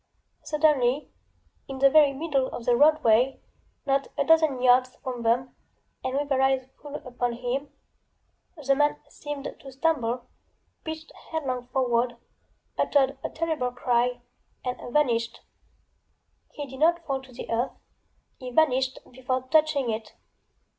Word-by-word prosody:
SuddenlyŌĆöin 285 -2 -1
the 275 - +7
very 295 -2 +7
middle 275 -2 0
of 235 - -7
the 245 - +4
roadway, 265 -3 +4 0.5
not 275 0 +1
a - - +2
dozen 315 -5 +4
yards 255 0 +4
from 250 -2 -6
them, 240 +3 0 0.5
and 260 - -2
with 290 +1 0
their 270 -2 +1
eyes 265 -1 +2 0.2
full 290 0 -8
upon 245 -2 -3
himŌĆöthe 275 +2 -5
man 295 0 +2
seemed 290 -1 -6
to 270 - -11
stumble, 255 -4 0 0.6
pitched 315 0 -7 0.2
headlong 255 -6 -3
forward, 245 -2 0 0.6
uttered 275 -1 +3
a - - -2
terrible 315 -6 -1
cry 245 0 0 0.4
and 250 -1 -4
vanished! 235 -5 +1 1.1
He 290 - -6
did 265 -1 -10
not 335 +2 +3
fall 270 -2 -2
to 260 -1 -16
the 245 - -7
earthŌĆöhe 250 +1 -6
vanished 265 -4 +3
before 255 0 -2
touching 305 -6 +3
it. 220 0 -5
265 Hz, 125 wpm, -26 LUFS, 250-290 Hz, 1.1 s, the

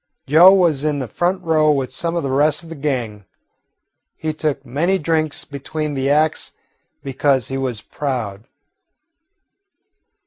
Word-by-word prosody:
Joe 160 +7 +7
was 170 -7 +2
in 150 -2 0
a - - -6
front 180 - -1
row 155 -2 +2
with 135 -4 0
some 170 +4 -1
of 170 - -1
the 135 - -2
rest 150 +4 +2
of 165 - -13
the 165 - -7
gang. 125 -9 -3 0.9
He 155 -1 -3
took 150 -3 -3
many 160 +10 0
drinks 155 -2 0
between 150 +2 -5
the 135 0 -1
acts, 155 +2 +1 0.5
because 135 -2 0
he 135 - -3
was 125 -6 -3
proud. 115 -8 -4
145 Hz, 145 wpm, -19 LUFS, 135-160 Hz, 0.9 s, Joe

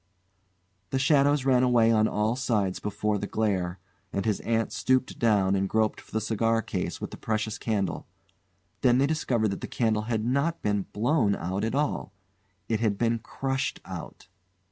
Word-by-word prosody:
The 135 - 0
shadows 140 0 +3
ran 130 -2 +4
away 120 -3 +4
on 110 -1 +4
all 110 +2 0
sides 110 -8 0
before 105 0 -1
the 100 - -3
glare, 95 -5 -1 0.3
and 100 - -2
his 110 -3 +1
aunt 115 -1 -1
stooped 130 0 0
down 100 -5 +3
and 95 0 0
groped 110 -1 +1
for - - -21
the 110 - 0
cigar 115 +1 +1
case 95 -4 -3
with - - -5
the - - -8
precious 110 -1 -2
candle. 105 -4 -2 0.7
Then 125 -1 +4
they 135 - +4
discovered 125 -8 0
that 100 - -4
the - - -4
candle 110 -3 0
had 110 -2 0
not 140 +7 0
been 105 -2 0
blown 115 -2 +2
out 95 +4 -3
at 115 +3 -1
all; 145 -8 -1 0.5
it 110 -2 0
had 110 -3 +1
been 115 0 +1
crushed 135 +4 -3
out. - - -8
110 Hz, 175 wpm, -27 LUFS, 105-125 Hz, 0.7 s, ran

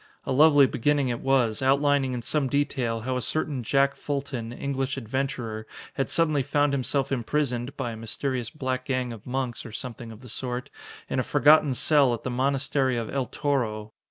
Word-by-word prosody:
A - - -2
lovely 145 +1 +6
beginning 140 +2 +1
it 120 -1 -2
was, 125 -5 +1
outlining 140 0 +2
in 120 -1 -4
some 145 +2 +1
detail 130 -5 -1
how 130 +2 -2
a - - -2
certain 150 -1 -1
Jack 140 +4 +2
Fulton, 135 -5 -4
English 135 +2 -3
adventurer, 120 -3 -3 0.3
had 135 - -2
suddenly 155 -4 +2
found 145 +1 +1
himself 140 0 0
imprisoned 125 0 -1
(by 125 -4 -2
a - - -6
mysterious 120 +2 -3
black 130 -3 -3
gang 130 -3 -1
of 110 0 -12
monks, 125 -1 -3
or 115 - -9
something 115 0 -7
of 110 +1 -12
the 125 - -12
sort) 125 +2 -4 0.4
in - - -1
a - - +1
forgotten 145 0 +4
cell 140 -3 +4
at 115 - -12
the 130 - -3
monastery 135 0 +1
of 115 -2 -3
El 135 -3 -1
Toro. 110 -7 -2
130 Hz, 185 wpm, -26 LUFS, 120-140 Hz, 0.4 s, lovely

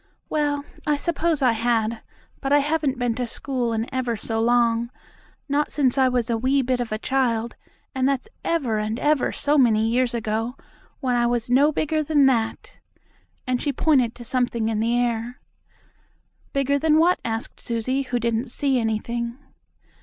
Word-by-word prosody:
"Well, 290 -2 0 0.2
I 300 - +3
suppose 325 -1 0
I 250 - +5
had, 225 -1 0 0.4
but 275 - -2
I 290 - +6
haven't 290 -2 0
been 245 -1 0
to 245 +1 -3
school 250 -1 -2
in 225 0 -1
ever 250 -3 -1
so 225 +2 -2
long 235 0 +2 0.6
not 290 +1 0
since 265 -4 +2
I 265 -1 +4
was 250 -3 0
a 230 -2 0
wee 265 +3 +2
bit 255 0 0
of 240 -2 -3
a 215 - -1
child, 235 -2 0 0.4
and 265 0 +1
that's 275 - -1 0.2
ever 260 -10 0
and 215 +1 -2
ever 295 +1 +1
so 290 +1 +1
many 220 -3 +4
years 245 +1 +1
ago, 225 +2 -2 0.5
when 255 -3 +1
I 240 0 +2
was 240 0 -1
no 280 +4 +5
bigger 310 +1 0
than 295 -2 +3
that," 230 -4 0 0.7
and 250 -1 -1
she 290 - 0
pointed 260 -4 +2
to 240 - -10
something 240 -2 -1
in 220 -1 -1
the 230 +2 +1
air. 240 0 -1 1.1
"Bigger 275 +1 +1
than 310 +1 +3
what?" 345 +3 +4
asked 225 0 -4
Susie, 240 +3 -1
who 255 -2 -2
didn't 235 +1 -1
see 270 +1 0
anything. 235 +2 -2
245 Hz, 175 wpm, -23 LUFS, 230-275 Hz, 1.1 s, I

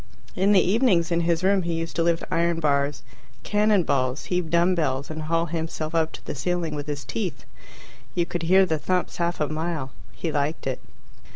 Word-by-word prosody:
In 195 +1 +3
the 200 - +7
evenings 185 -4 +3
in 170 - +2
his 170 0 +1
room 195 0 +3
he 170 -1 -2
used 165 0 -4
to - - +2
lift 170 0 +1
iron 170 0 +1
bars, 140 -2 +1 0.4
cannon 210 -2 +3
balls, 130 -2 0
heave 180 -2 0
dumb 170 +2 +3
bells, 140 -4 -1
and 155 0 -5
haul 165 +2 0
himself 160 -1 -4
up 160 -1 +1
to - - -10
the - - -4
ceiling 170 +3 -1
with 145 0 -5
his 145 -1 -4
teeth. 190 - -4 0.7
You 175 - +2
could 175 0 -4
hear 190 +3 +5
the 160 -4 -1
thumps 180 +3 -1
half 170 0 -1
a 150 - +1
mile. 155 -3 -3 0.2
He 165 - -3
liked 150 +2 -1
it. 130 -1 -2
165 Hz, 200 wpm, -25 LUFS, 155-175 Hz, 0.7 s, the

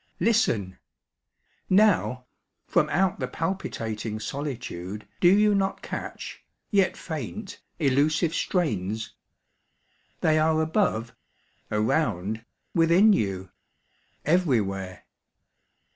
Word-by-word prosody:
Listen! 170 - +1 0.9
Now, 185 -11 +3 0.4
From - - +2
out 185 +4 +1
the - - -1
palpitating 115 - -3
solitude 110 -7 -5
Do 175 - +5
you 205 +3 +5
not 195 -1 0
catch, - - -6 0.3
yet 195 -3 +3
faint, 175 - -6 0.2
elusive 155 +3 +2
strains? 110 - -1 1.1
They 155 0 +3
are 160 0 +3
above, 160 - 0 0.6
around, 110 - 0 0.3
within 170 +6 +5
you, 95 - -1 0.7
everywhere. 105 - 0
155 Hz, 85 wpm, -26 LUFS, -, 1.1 s, Do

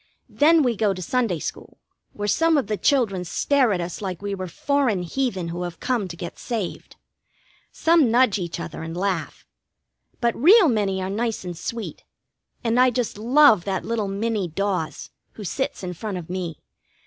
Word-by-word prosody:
Then 315 +1 +4
we 245 -3 +1
go 205 -2 +1
to 185 - -7
Sunday 230 -5 0
school, - - -7 0.4
where 205 0 -4
some 325 - +3
of 275 - +1
the 210 +1 -1
children 210 -7 +1
stare 260 - +2
at 185 - 0
us 170 +2 -5
like 185 -4 -4
we 200 0 -4
were 185 -1 -4
foreign 245 0 0
heathen 190 -3 -2
who 175 +1 -4
have 175 -2 -5
come 240 -6 -1
to 170 - -8
get 170 0 -7
saved. 220 -7 -5 0.8
Some 325 -6 +3
nudge 235 -3 +3
each 170 -2 -4
other - - -6
and 165 +1 -6
laugh. 185 -3 -2 0.7
But 235 -1 +1
real 370 - +7
many 195 -5 0
are 185 - -3
nice 225 +1 -2
and 175 -1 -5
sweet, 230 +6 -6 0.6
and 235 +1 +2
I 255 0 +6
just 245 -4 -2
love 240 - +5
that 195 -2 -2
little 225 -3 -1
Minnie 205 0 -1
Dawes, 185 -1 -3 0.2
who 215 - -9
sits 265 +3 -3
in 180 -1 -4
front 195 +2 -5
of 175 -1 -7
me. 180 -4 -4
205 Hz, 185 wpm, -23 LUFS, 180-245 Hz, 0.8 s, real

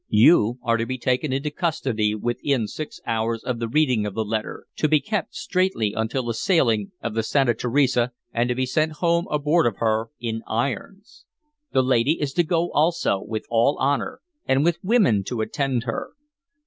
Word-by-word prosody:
You 115 +1 +5
are 115 0 +2
to 115 - -1
be 130 - -3
taken 130 +3 0
into 140 +3 -1
custody 130 - -1
within 120 +2 -1
six 155 +8 -7
hours 115 0 -1
of 125 -2 -3
the 115 - -2
reading 125 -5 +2
of 100 - -6
the 110 -1 -1
letter, 110 +1 -4
to 155 - +2
be 155 0 +5
kept 210 +1 -3
straitly 180 - 0
until 110 +4 -1
the 120 - -1
sailing 115 - +1
of 115 - -3
the 115 - 0
Santa 125 +2 +2
Teresa, 125 -1 +1 0.2
and 120 +1 +1
to 125 - 0
be 130 +1 0
sent 155 +5 0
home 170 +2 +1
aboard 150 +1 +2
of 110 - -2
her 110 0 0
in 115 -2 -3
irons. 195 - -4 0.5
The 130 - +3
lady 130 +4 +2
is 140 -2 -2
to 175 - +3
go 170 +1 0
also, 155 - +1
with 110 0 -5
all 120 +5 +3
honor, 145 - -1 0.3
and 135 +1 +3
with 170 -1 +1
women 185 - +3
to 115 0 -3
attend 130 +1 -1
her. 115 -2 -4
130 Hz, 185 wpm, -23 LUFS, 115-155 Hz, 0.5 s, You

